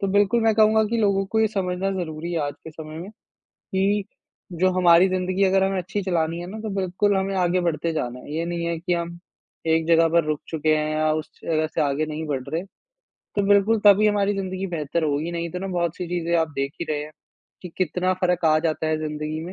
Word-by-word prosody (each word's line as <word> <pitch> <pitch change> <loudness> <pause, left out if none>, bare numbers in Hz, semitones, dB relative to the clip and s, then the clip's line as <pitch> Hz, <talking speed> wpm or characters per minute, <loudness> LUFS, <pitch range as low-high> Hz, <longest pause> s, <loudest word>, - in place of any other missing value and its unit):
तो 195 - 0
बिल्कुल 205 +4 +3
मैं 225 -1 +3
कहूँगा 220 0 +5
कि 225 +2 -1
लोगों 200 -2 +2
को 220 +3 0
ये 220 - +4
समझना 190 -2 -2
ज़रूरी 160 +1 -5
है 170 - 0
आज 145 - -5
के 160 - -8
समय 155 0 -9
में, 180 +4 -7 0.4
कि 195 +2 -1 0.5
जो 185 +2 +2
हमारी 175 0 +6
ज़िंदगी 185 +1 0
अगर 190 0 +3
हमें 195 0 0
अच्छी 195 +3 -3
चलानी 170 -2 0
है 175 - -6
ना 220 - -7
तो 220 - -4
बिल्कुल 195 +2 +1
हमें 195 0 -1
आगे 180 0 +2
बढ़ते 170 -1 -1
जाना 125 -5 -3
है। 145 - -9
ये 165 +1 -1
नहीं 170 0 -3
है 170 0 -1
कि 175 +2 -1
हम 170 0 -3 0.5
एक 160 0 +2
जगह 165 0 +5
पे 170 - +6
रुक 150 -1 -1
चुके 155 -1 +1
हैं 155 0 -1
या 155 0 +2
उस 155 0 -4
जगह 155 -1 0
से - - -2
आगे 145 +1 0
नहीं 155 +1 -5
बढ़ 135 -3 -2
रहें। 165 +5 -3 0.7
तो 205 - +2
बिल्कुल 205 +2 +4
तभी 205 +1 +7
हमारी 205 -1 +2
ज़िंदगी 190 0 -3
बेहतर 165 -2 -2
होगी 150 +2 -1
नहीं 170 0 -3
तो 180 - -4
ना 195 - -4
बहुत-सी 175 -1 -2
चीज़ें 170 -1 -1
आप 160 -1 +1
देख 140 +1 -1
ही - - -1
रहे 150 -1 -1
हैं, 150 - -11 0.5
कि 180 - -6
कितना 185 +1 +1
फ़र्क 180 -1 +1
आ 155 -1 +5
जाता 160 0 -1
है 155 0 0
ज़िंदगी 155 0 -4
में। 180 - -7
175 Hz, 235 wpm, -23 LUFS, 155-195 Hz, 0.7 s, तभी